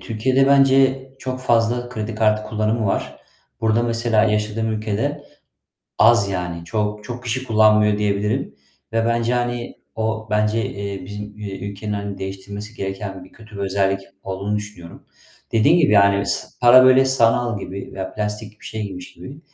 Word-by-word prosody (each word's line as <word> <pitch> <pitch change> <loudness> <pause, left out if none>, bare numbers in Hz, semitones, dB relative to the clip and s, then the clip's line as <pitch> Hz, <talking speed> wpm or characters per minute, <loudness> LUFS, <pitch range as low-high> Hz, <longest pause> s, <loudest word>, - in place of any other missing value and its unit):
Türkiye'de 130 +4 +1
bence 135 -1 +4 0.2
çok 130 -1 -5
fazla 120 0 +1
kredi 110 -2 -5
kartı 110 -1 +2
kullanımı 110 0 0
var. - - -2 0.4
Burada 110 +1 +2
mesela 115 -2 +1
yaşadığım 105 +1 0
ülkede 110 +8 -2 0.7
az 115 -3 +5
yani 90 -3 -4
çok 105 +3 -2
çok 120 +3 -7
kişi 130 +2 -2
kullanmıyor 105 -2 +4
diyebilirim 105 - -1 0.4
ve 115 0 +1
bence, 115 +1 +1
hani, 120 -1 -2 0.2
o 110 0 -2
bence, 105 +1 +1
eee, 100 -2 -6
bizim, 105 +1 -8
eee, 100 -2 -6
ülkenin, 105 +1 -5
hani, 100 -1 -4
değiştirmesi 100 +3 -7
gereken 95 -1 -5
bir - - -19
kötü 110 -2 -14
bir - - -6
özellik 95 0 0 0.2
olduğunu 100 +2 -3
düşünüyorum. 105 -5 -9 0.5
Dediğin 140 +10 +4
gibi, 150 -10 +3
yani 100 -1 +5
ıs - - -3
para 125 +1 +8
böyle 130 +1 +6
sanal 120 -3 +2
gibi 95 0 -7
veya 95 -1 -6
plastik 105 0 -5
bir - - -16
şey 110 - -5
gibiymiş 95 -3 -7
gibi, 140 +3 -11
110 Hz, 155 wpm, -21 LUFS, 100-120 Hz, 0.7 s, para